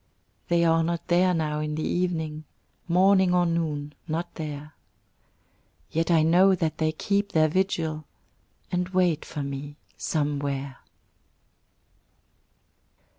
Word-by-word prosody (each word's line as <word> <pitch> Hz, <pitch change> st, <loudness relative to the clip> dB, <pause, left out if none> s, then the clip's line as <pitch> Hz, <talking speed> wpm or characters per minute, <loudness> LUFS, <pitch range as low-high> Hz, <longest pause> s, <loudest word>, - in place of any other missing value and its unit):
They 170 Hz, 0 st, +3 dB
are 165 Hz, 0 st, +4 dB
not 170 Hz, 0 st, -3 dB
there 180 Hz, +1 st, +4 dB
now 155 Hz, -3 st, -1 dB
in 150 Hz, 0 st, -2 dB
the 155 Hz, -, -3 dB
evening 160 Hz, -4 st, -2 dB, 0.4 s
Morning 185 Hz, +1 st, +4 dB
or 175 Hz, 0 st, +3 dB
noon 155 Hz, -4 st, -2 dB
not 165 Hz, +2 st, -3 dB
there; 150 Hz, -1 st, -6 dB, 1.2 s
Yet 165 Hz, +2 st, 0 dB
I 165 Hz, -2 st, +4 dB
know 185 Hz, +4 st, +5 dB
that 160 Hz, -3 st, -2 dB
they 155 Hz, 0 st, +2 dB
keep 200 Hz, +5 st, -1 dB
their 155 Hz, -1 st, +4 dB
vigil, 160 Hz, -3 st, -1 dB, 0.7 s
And 180 Hz, 0 st, -1 dB
wait 180 Hz, -4 st, +1 dB
for 145 Hz, -, -5 dB
me 140 Hz, +1 st, -6 dB, 0.2 s
Somewhere. 140 Hz, -3 st, -2 dB
160 Hz, 120 wpm, -26 LUFS, 150-175 Hz, 1.2 s, know